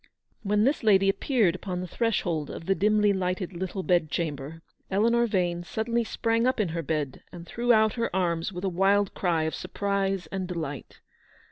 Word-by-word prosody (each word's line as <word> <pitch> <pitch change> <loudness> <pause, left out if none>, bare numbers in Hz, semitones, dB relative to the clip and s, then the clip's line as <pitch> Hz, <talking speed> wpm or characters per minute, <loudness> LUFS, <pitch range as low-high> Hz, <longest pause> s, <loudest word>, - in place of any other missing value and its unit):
"When 210 0 +1
this 275 +6 +2
lady 195 -4 +4
appeared 200 -2 +2
upon 185 0 -4
the 180 - -4
threshold 175 -8 -1
of 165 - -7
the 195 - +3
dimly 210 +1 +3
lighted 185 0 -2
little 185 +2 -4
bedchamber, 160 -3 -1 0.3
Eleanor 235 +4 +3
Vane 175 -4 0
suddenly 230 +5 -1
sprang 230 +1 0
up 255 -1 0
in 205 -5 +1
her 165 +1 -3
bed, 150 -3 -3
and 175 -2 -9
threw 240 +7 0
out 220 -2 +4
her 230 -1 -1
arms 170 0 0
with 180 0 -7
a - - +1
wild 195 +2 +2
cry 170 -4 0
of 160 - -2
surprise 195 -2 -2
and 190 -1 -3
delight. 155 -7 -6
190 Hz, 175 wpm, -27 LUFS, 170-215 Hz, 0.3 s, lady